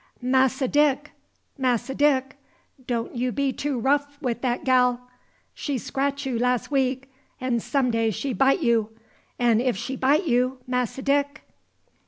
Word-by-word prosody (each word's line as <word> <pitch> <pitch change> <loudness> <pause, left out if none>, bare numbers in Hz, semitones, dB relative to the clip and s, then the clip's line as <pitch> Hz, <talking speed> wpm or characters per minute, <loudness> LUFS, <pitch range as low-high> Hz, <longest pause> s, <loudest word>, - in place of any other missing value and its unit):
"Masse 260 +1 +2
Dick! 290 +1 +2 0.5
Masse 255 -2 0
Dick! 270 -1 +1 0.5
don' 235 -2 -2
you 250 +1 -1
be 275 +1 0
too 285 -1 -2
rough 285 +3 0
wi' 255 -6 -1
dat 240 +1 -2
gal! 250 -2 +3 0.5
She 285 -3 -3
scratch 280 +3 -2
you 250 -3 -2
las' 250 +2 0
week, 265 -1 0 0.3
'n' 255 -2 0
some 255 +1 0
day 225 -1 +1
she 255 +5 -3
bite 270 - +2
you; 230 -3 +2 0.5
'n' 235 -2 +3
if 250 -5 0
she 265 +6 -4
bite 285 +8 +2
you, 255 -1 +1
Masse 250 -2 -1
Dick!" 285 +1 0
260 Hz, 150 wpm, -24 LUFS, 245-280 Hz, 0.5 s, gal